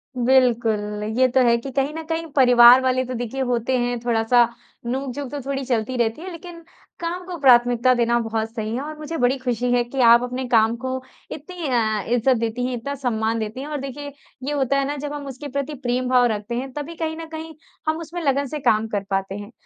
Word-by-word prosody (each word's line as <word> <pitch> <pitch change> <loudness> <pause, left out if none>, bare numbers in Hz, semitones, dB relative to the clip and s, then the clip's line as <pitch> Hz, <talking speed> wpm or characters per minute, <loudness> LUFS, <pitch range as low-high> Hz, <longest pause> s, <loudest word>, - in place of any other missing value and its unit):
बिल्कुल, 230 -5 +2
ये 260 - +5
तो 260 +1 +2
है 235 0 +4
कि 265 +3 -7
कहीं 275 +3 -1
न 320 0 -5
कहीं, 325 0 -2
परिवार 245 -1 +8
वाले 255 0 +1
तो, 255 - -5
देखिए, 245 +2 -4
होते 250 0 0
हैं। 245 0 -1
थोड़ा-सा 235 0 +3 0.4
नोक-झोंक 265 +2 -4
तो 290 - -4
थोड़ी 275 +1 -3
चलती 245 0 -1
रहती 235 +4 0
है, 370 +1 -7
लेकिन 335 0 -10 0.4
काम 345 +2 -4
को 355 -2 -6
प्राथमिकता 245 -2 +5
देना 235 -1 +2
बहुत 225 -1 -2
सही 220 -1 -4
है, 260 - -2
और 305 +1 -7
मुझे 310 +2 -5
बड़ी 250 +2 +2
खुशी 245 -1 -1
है 245 0 +3
कि 240 +3 -6
आप 235 +1 +7
अपने 250 +1 -3
काम 225 -1 +3
को 260 0 -1 0.4
इतनी 325 +1 -6
अ, 220 -4 +1
इज़्ज़त 245 +1 +2
देती 230 +2 -2
हैं, 255 - -2
इतना 280 +5 -5
सम्मान 230 -4 -1
देती 220 +3 -4
हैं, 285 - -6
और 300 - -3
देखिए, 285 +2 -6 0.3
ये 285 - -2
होता 275 -1 +1
है 275 - +1
ना, 290 - -2
जब 290 +1 -5
हम 290 -1 -6
उसके 275 +2 -7
प्रति 280 +2 -2
प्रेम 250 +1 -1
भाव 250 -1 +5
रखते 210 +3 -5
हैं, 265 +2 -4
तभी 300 +3 -6
कहीं 320 -1 -3
न 330 - -6
कहीं, 320 0 -7 0.3
हम 315 - +1
उसमें 335 +1 -6
लगन 280 -2 +1
से 300 - -3
काम 220 +1 +2
कर 205 -2 -2
पाते 195 0 -2
हैं। 205 +2 -8
255 Hz, 225 wpm, -22 LUFS, 235-280 Hz, 0.4 s, परिवार